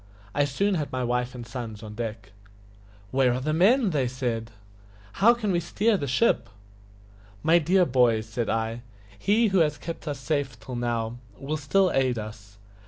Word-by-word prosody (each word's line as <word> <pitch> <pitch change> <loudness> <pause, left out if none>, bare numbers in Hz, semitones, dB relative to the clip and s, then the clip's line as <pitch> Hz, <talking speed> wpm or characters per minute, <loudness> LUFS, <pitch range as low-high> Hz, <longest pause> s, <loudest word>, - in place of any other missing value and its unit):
I 145 0 +2
soon 195 +9 0
had 155 -5 -2
my 130 -1 -2
wife 125 +1 -1
and 120 -1 -7
sons 115 -3 -7
on 105 -1 -8
deck. 110 -2 -6 0.8
"Where 130 -2 +3
are - - -2
the 155 +4 -1
men?" 205 - +4 0.2
said 120 -3 -2
they. - - -20 0.7
"How 235 +4 +6
can 215 -4 -1
we 175 - +2
steer 205 +6 +1
the 145 -7 -2
ship?" 130 - +2 0.9
"My 165 +2 +5
dear 180 +3 +3
boys," 120 -5 +3
said 115 0 -3
I, 115 +1 -1 0.4
"He 215 - +3
who 190 -1 +3
has 150 -3 +2
kept 165 -1 -7
us 145 -1 -2
safe 135 -3 -2
till 125 +3 -7
now 120 -1 -2 0.2
will 145 +3 -3
still 185 +6 +2
aid 130 -2 +2
us. 105 -1 -8
130 Hz, 175 wpm, -26 LUFS, 115-170 Hz, 0.9 s, How